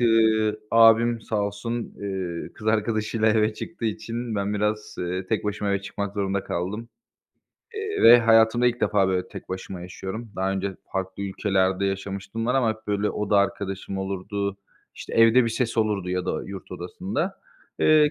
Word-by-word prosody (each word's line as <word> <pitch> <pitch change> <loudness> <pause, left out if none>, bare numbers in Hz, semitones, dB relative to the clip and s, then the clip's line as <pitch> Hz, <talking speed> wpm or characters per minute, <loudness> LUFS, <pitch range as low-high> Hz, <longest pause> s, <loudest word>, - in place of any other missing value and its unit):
ııı, 110 -2 +3
abim 115 +1 +6
sağ 110 -1 -1
olsun, 105 +4 -4
eee, 95 -4 -4
kız 105 - -10
arkadaşıyla 110 0 +1
eve 110 0 +2
çıktığı 170 +1 -7
için 115 +1 -3
ben 100 +1 -1
biraz, 105 +1 -1
eee, 90 +1 -3
tek 110 +2 -1
başıma 105 0 -1
eve 100 - +1
çıkmak 100 0 -4
zorunda 100 -1 -1
kaldım, 105 +7 -3 0.9
eee, 420 0 -3
ve 120 +1 +10
hayatımda 115 +1 +5
ilk 120 0 +1
defa 100 -2 +3
böyle 95 -1 -1
tek - - -10
başıma 95 0 -6
yaşıyorum. 95 +5 -7
Daha 95 +1 0
önce 95 0 -3 0.2
farklı 95 +1 -3
ülkelerde 95 -1 0
yaşamışlığım 100 +3 -4
var 125 - +1
ama 130 -4 +3
hep, 110 -1 -8
böyle, 105 0 0
oda 105 -1 +1
arkadaşım 95 -1 -2
olurdu, 100 +1 -3 0.4
işte, - - -8
evde 115 +2 +6
bir - - +1
ses 120 +1 -1
olurdu 105 -5 0
ya 90 0 -1
da - - -1
yurt 95 -2 -8
odasında. 185 - -4 0.4
Eee, 155 -1 +5
105 Hz, 165 wpm, -25 LUFS, 95-115 Hz, 0.9 s, ve